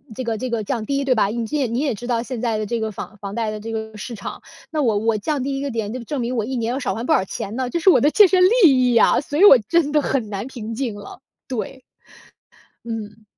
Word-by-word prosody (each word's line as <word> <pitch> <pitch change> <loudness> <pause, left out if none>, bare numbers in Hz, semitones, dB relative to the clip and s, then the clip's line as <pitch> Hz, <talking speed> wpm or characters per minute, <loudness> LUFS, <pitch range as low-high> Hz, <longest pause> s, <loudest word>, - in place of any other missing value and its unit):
这 255 - -4
个 225 -2 -2
这 255 +3 -4
个 230 -2 -1
降 220 0 -3
低， 275 +2 -1
对 260 -2 +2
吧？ 215 - +3
你 230 +3 -3
这 300 - -2
也 280 - +1
你 235 +3 -2
也 275 -5 0
知 240 +4 -9
道 235 -2 0
现 245 0 -5
在 230 -3 0
的 215 - -2
这 235 +1 -2
个 220 -1 -2
房 210 +1 -8
房 200 0 -7
贷 225 0 -1
的 215 0 -5
这 225 +2 -7
个 220 -1 -5
市 240 - -7
场， 200 - -7 0.3
那 305 -2 -1
我 220 -5 +2
我 220 0 +1
降 285 +5 -2
低 275 0 -2
1 275 - -4
个 280 - -3
点， 220 -2 -3
就 255 -2 -6
证 280 +2 -3
明 240 +2 -2
我 220 - -1
1 260 +3 -4
年 230 -1 -1
要 265 - -2
少 195 - -2
还 230 +4 -5
不 - - -1
少 190 - +2
钱 200 +3 -6
呢， 255 -1 -2
这 340 - -1
是 380 - +5
我 - - +6
的 295 +2 +3
切 420 -2 +7
身 365 0 +3 0.2
利 255 -6 +5
益 - - +1
啊， - - +5
所 290 +1 -4
以 390 - +5
我 275 - +10
真 295 +6 0
的 300 - +3
很 250 -6 -1
难 200 +1 -4
平 230 -4 -7
静 240 -3 -2
了， 205 +5 -11 0.3
对。 255 +1 -5 1.0
嗯。 220 -1 -7
235 Hz, 305 characters per minute, -21 LUFS, 220-275 Hz, 1.0 s, 我